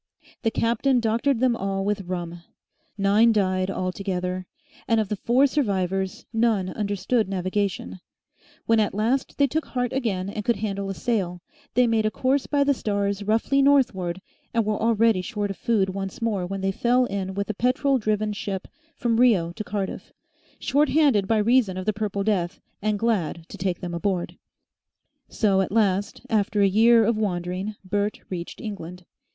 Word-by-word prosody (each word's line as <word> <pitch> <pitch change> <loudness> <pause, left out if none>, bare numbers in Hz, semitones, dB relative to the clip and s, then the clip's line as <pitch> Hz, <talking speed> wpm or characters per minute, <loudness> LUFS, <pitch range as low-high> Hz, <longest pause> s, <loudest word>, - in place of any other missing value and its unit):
The 225 - +2
captain 240 +4 +1
doctored 235 +3 +1
them 255 -2 +3
all 195 -1 -2
with 200 -2 -2
rum. 175 -1 -4 0.6
Nine 205 +4 +4
died 185 -3 +1
all 185 -1 -2
together, 185 -1 -3 0.4
and 225 -1 +3
of 215 -3 -1
the 210 - -1
four 245 +7 +3
survivors 195 -9 -1
none 225 -5 +2
understood 205 +2 -1
navigation; 185 - -2 0.7
when 225 -1 +3
at 210 -2 0
last 235 +6 0
they 280 - +5
took 305 +3 -1
heart 245 -1 -2
again 210 -8 -1
and 210 +1 -4
could 235 +2 +2
handle 200 -1 -3
a 195 - -3
sail, 185 -8 -2 0.3
they 250 - +5
made 225 -2 +2
a - - +2
course 260 +4 0
by 285 -1 +2
the 280 0 +3
stars 200 -4 -1
roughly 225 +7 +2
northward 195 -11 +2 0.3
and 230 -2 +2
were 210 0 -1
already 225 -3 +3
short 205 0 -3
of 195 - -7
food 205 -5 +1
once 195 0 -5
more 210 -6 -1
when 195 +1 -4
they 195 0 +1
fell 245 +5 +2
in 195 -3 -4
with 200 0 -2
a - - -6
petrol 260 +5 +1
driven 215 -1 0
ship 195 -2 -4 0.3
from 235 -2 0
Rio 205 -10 +4
to 215 - -5
Cardiff, 200 -2 -4 0.5
shorthanded 285 -7 +3
by 225 - +2
reason 215 -3 +3
of 185 - -4
the 215 - +1
Purple 205 -1 -2
Death 195 -3 0 0.2
and 210 0 0
glad 195 -7 -1
to - - -8
take 185 -2 -2
them 175 -1 -5
aboard. 175 0 -2 0.9
So 195 -3 +2
at 190 - -2
last, 205 +1 0
after 215 -2 +1
a - - +6
year 225 +3 +5
of 230 0 +1
wandering 185 +1 -2
Bert 205 +2 -1
reached 175 -2 -5
England. 180 -4 -7
205 Hz, 175 wpm, -24 LUFS, 190-230 Hz, 0.9 s, a